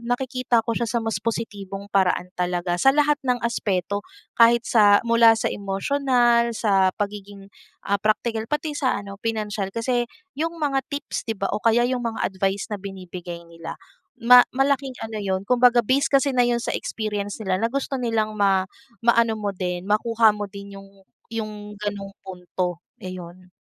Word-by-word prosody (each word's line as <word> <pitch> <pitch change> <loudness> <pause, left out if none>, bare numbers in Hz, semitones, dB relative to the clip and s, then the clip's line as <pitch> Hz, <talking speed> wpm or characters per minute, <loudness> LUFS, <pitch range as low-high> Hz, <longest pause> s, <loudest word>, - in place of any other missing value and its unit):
nakikita 245 -1 0
ko 230 - -1
siya 235 +1 -1
sa 230 0 -1
mas 225 -4 -2
positibong 205 -3 -5
paraan 180 -2 +1
talaga. 175 -1 -1
Sa - - +5
lahat 295 +1 +3
ng 250 -3 +1
aspeto 200 -3 -1 0.3
kahit 235 0 +5
sa 205 -3 +5
mula 230 -1 +6
sa - - -1
emosyonal, 235 +3 +1
sa 195 -4 +3
pagiging, 200 -1 -6 0.3
ah, 200 0 0
praktikal, 220 +2 0
pati 300 +1 -2
'yong 290 - -5
sa 260 -3 +1
ano, 200 0 -8
pinansiyal. 210 -3 -2
Kasi, 240 +1 0 0.3
'yong 330 +1 -1
mga 275 -4 -1
tips 285 -4 -5
'di 225 - -1
ba, 195 - -2
o - - -1
kaya 230 +2 +3
'yong 250 0 0
mga 230 -2 -3
advice 195 +1 -1
na 205 - -4
binibigay 180 -3 -8
nila 165 -1 -9 0.5
ma 245 +1 +8
malaking 270 0 +1
ano 220 -1 -5
'yon 190 -2 -1
kumbaga 245 +2 +4
based 260 +5 +2
kasi 275 +1 +4
na 250 -2 +3
'yon 235 -1 0
sa - - -2
experience 210 -1 -3
nila, 190 -2 0
na 225 - +1
gusto 270 +2 -2
nilang 220 -3 -1
ma 195 -2 +3 0.4
maano 235 -1 +3
mo 210 -2 -3
din, 180 -2 -3
makuha 225 +1 +4
mo 210 0 -4
din 200 0 -10
'yong 195 0 -14 0.4
'yong 210 -2 -5
gano'ng 200 -1 -5
punto. 180 -1 -4 0.2
Iyon. 185 0 -9
215 Hz, 170 wpm, -23 LUFS, 195-240 Hz, 0.5 s, ma